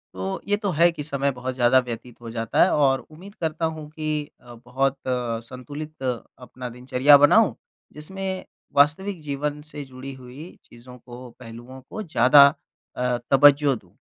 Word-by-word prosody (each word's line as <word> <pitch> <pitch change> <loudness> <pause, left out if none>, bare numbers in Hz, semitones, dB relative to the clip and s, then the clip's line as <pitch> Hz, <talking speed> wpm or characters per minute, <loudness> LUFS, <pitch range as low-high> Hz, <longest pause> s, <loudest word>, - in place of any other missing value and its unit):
तो 95 +1 -4
ये 205 - +2
तो 205 -1 -2
है 170 +3 +4
कि 150 -3 -7
समय 140 -1 -1
बहुत 130 +1 -4
ज़्यादा 125 +1 +4
व्यतीत 115 +1 -8
हो 115 - -8
जाता 115 -1 0
है - - +3
और 135 -3 +3
उम्मीद 185 +6 -13
करता 160 0 -1
हूँ 150 -1 -9
कि 155 -1 -3
अ, 120 0 -13
बहुत 135 +2 0
संतुलित 130 +5 -5
अपना 125 0 -6
दिनचर्या 125 +4 +4
बनाऊँ 220 +7 +4 0.4
जिसमें 190 +4 -5 0.3
वास्तविक 160 +6 +2
जीवन 150 0 -4
से 145 - -7
जुड़ी 130 +1 -9
हुई 140 +8 -10 0.2
चीज़ों 125 +1 -14
को 125 +1 -12
पहलुओं 120 +2 -11
को 215 - -6
ज़्यादा 140 - +6 0.5
अ, 125 -1 0
तवज्जो 140 0 +5
दूँ। 90 -6 -16
135 Hz, 160 wpm, -23 LUFS, 125-150 Hz, 0.5 s, ज़्यादा